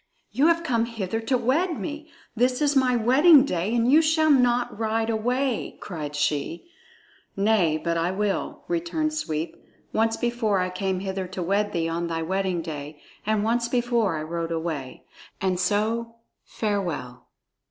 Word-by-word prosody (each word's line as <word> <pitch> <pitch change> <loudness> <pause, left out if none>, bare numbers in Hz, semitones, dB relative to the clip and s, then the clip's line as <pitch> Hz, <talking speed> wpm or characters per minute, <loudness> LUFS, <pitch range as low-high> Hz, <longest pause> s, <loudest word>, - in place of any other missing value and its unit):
"You 290 +4 +3
have 335 0 +3
come 235 -7 +1
hither 225 -2 -3
to 250 +3 0
wed 305 +9 0
me. 305 0 -6 0.3
This 250 +2 +2
is 290 -1 +2
my 255 -2 +3
wedding 270 +6 +6
day, 190 0 -1
and 235 0 +2
you 310 +3 +7
shall 315 -1 +3
not 245 -4 +2
ride 225 0 0
away!" 245 +3 -1
cried 150 -6 -6
she. 150 - -1 0.7
"Nay, 195 -6 +3
but 170 +1 -1
I 165 +1 +1
will," 200 +1 -2
returned 330 -3 -1
Sweep. 160 - -3 0.4
"Once 225 +1 +1
before 235 -4 0
I 185 0 0
came 185 0 -2
hither 190 -1 -3
to 185 0 -5
wed 205 +4 0
thee 165 -1 -1
on 170 +1 -2
thy 165 -1 -2
wedding 185 -1 -1
day, 150 -1 -7 0.3
and 215 -1 +1
once 235 +2 +1
before 235 -7 +1
I 155 - -4
rode 165 +1 -4
away. 160 -5 -4 0.4
And 185 -2 0
so 220 +5 0 0.3
farewell!" 170 - -3
215 Hz, 160 wpm, -25 LUFS, 170-245 Hz, 0.7 s, you